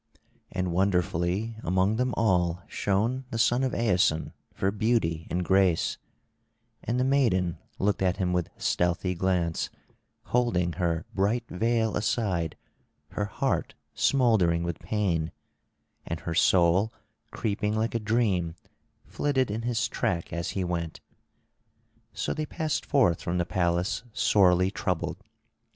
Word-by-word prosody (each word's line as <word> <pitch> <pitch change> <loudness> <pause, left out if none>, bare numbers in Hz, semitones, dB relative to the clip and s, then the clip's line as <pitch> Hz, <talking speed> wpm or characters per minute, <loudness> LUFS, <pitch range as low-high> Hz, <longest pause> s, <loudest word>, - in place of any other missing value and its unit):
And 90 -1 -1
wonderfully 90 +3 0
among 95 +5 +2
them 125 0 0
all 90 -5 +2
shone 115 +7 0
the 115 - -4
son 120 +3 +3
of 130 - 0
Aeson 90 -8 +1 0.2
for 95 - -1
beauty 100 -7 0
and 90 +1 -1
grace; 95 -3 +2 0.8
and 120 +2 -1
the - - +3
maiden 95 - +2 0.2
looked 100 0 0
at 95 -1 +1
him 90 -1 0
with 90 -2 0
stealthy 90 +1 0
glance, 90 -2 0 0.5
holding 90 -9 +1
her 85 -3 -1
bright 110 +5 0
veil 110 +3 +1
aside, 95 -7 -1 0.5
her 105 - -2
heart 100 - -1 0.2
smouldering 110 -11 +3
with 85 0 -3
pain; 85 -7 -1 0.7
and - - -5
her 85 - -3
soul 90 +5 +4 0.4
creeping 105 -1 -1
like 110 +1 0
a 115 - 0
dream 105 -7 0 0.5
flitted 130 -6 0
in 110 +2 -2
his 120 0 0
track 85 -2 -2
as 85 0 -2
he 95 - +1
went. 85 -2 -3 1.1
So - - -2
they 155 -1 -3
passed 155 -1 -2
forth 125 - +3
from 85 +1 -2
the 90 - +1
palace 90 +2 0
sorely 95 -3 +4
troubled. 90 -5 -2
95 Hz, 130 wpm, -27 LUFS, 85-115 Hz, 1.1 s, soul